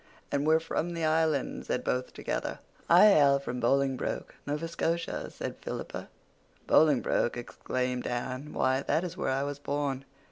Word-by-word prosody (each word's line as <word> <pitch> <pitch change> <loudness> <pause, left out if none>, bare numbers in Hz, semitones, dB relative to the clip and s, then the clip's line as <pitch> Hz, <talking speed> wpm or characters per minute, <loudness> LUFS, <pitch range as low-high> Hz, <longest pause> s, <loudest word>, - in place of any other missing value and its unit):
"And 140 +1 0
we're 160 +1 +5
from 170 +1 -2
the 165 -1 -1
Island," 155 -3 +1
said - - -1
both 125 0 -1
together. - - -3 0.3
"I 175 +3 +8
hail 140 -7 +6
from 125 -3 -4
Bolingbroke, 135 +1 0
Nova 150 +3 -2
Scotia," 165 0 -2
said - - -6
Philippa. - - -5 0.6
"Bolingbroke!" 145 -5 +3
exclaimed 125 +1 -3
Anne. 130 +4 -3
"Why, 130 +1 +1
that 160 - +1
is 180 - -5
where - - -2
I 135 +1 +1
was 145 0 -4
born." 140 -2 -2
140 Hz, 150 wpm, -29 LUFS, 130-160 Hz, 0.6 s, I